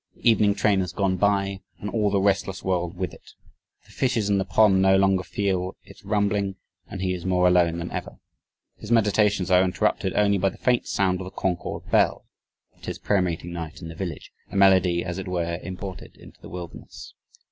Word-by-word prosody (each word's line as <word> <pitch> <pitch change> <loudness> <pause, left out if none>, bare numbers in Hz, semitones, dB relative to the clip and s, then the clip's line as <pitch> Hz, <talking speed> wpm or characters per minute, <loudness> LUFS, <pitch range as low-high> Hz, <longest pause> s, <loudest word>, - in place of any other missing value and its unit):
"The - - -3
evening 105 -3 +4
train 105 -3 +2
has 90 -1 -2
gone 95 -2 0
by," 100 0 +1 0.2
and 105 - -6
"all 105 -1 +1
the 100 0 +1
restless 95 -1 0
world 90 -1 -1
with 90 -1 -3
it. - - -16 0.5
The - - -20
fishes 115 -6 0
in 100 - +3
the 95 - -1
pond 100 -4 +4
no 95 0 +5
longer 95 -1 +3
feel 95 -1 -2
its - - -16
rumbling 100 -1 0 0.3
and 95 -3 -6
he 95 -1 0
is 90 -2 -6
more 90 -1 +2
alone 85 -2 +3
than 85 +1 -5
ever..." - - -6 0.6
His 110 - -9
meditations 105 -4 +2
are 90 0 +6
interrupted 90 -1 0
only 100 -1 +3
by 95 +1 +2
the - - -12
faint 125 -1 +1
sound 95 -2 +1
of - - -6
the - - -6
Concord 90 -2 -4
bell - - +2 0.6
'tis - - -5
prayer 100 -2 +1
meeting 85 -1 -3
night 80 -2 -6
in 80 - -6
the 80 - -9
village 85 -3 -6 0.2
"a - - -10
melody 95 -3 +4
as 90 0 -4
it 95 - -6
were, 85 -2 -2
imported 95 0 -8
into - - -16
the - - -11
wilderness..." 90 -1 -9
95 Hz, 200 wpm, -24 LUFS, 90-100 Hz, 0.6 s, are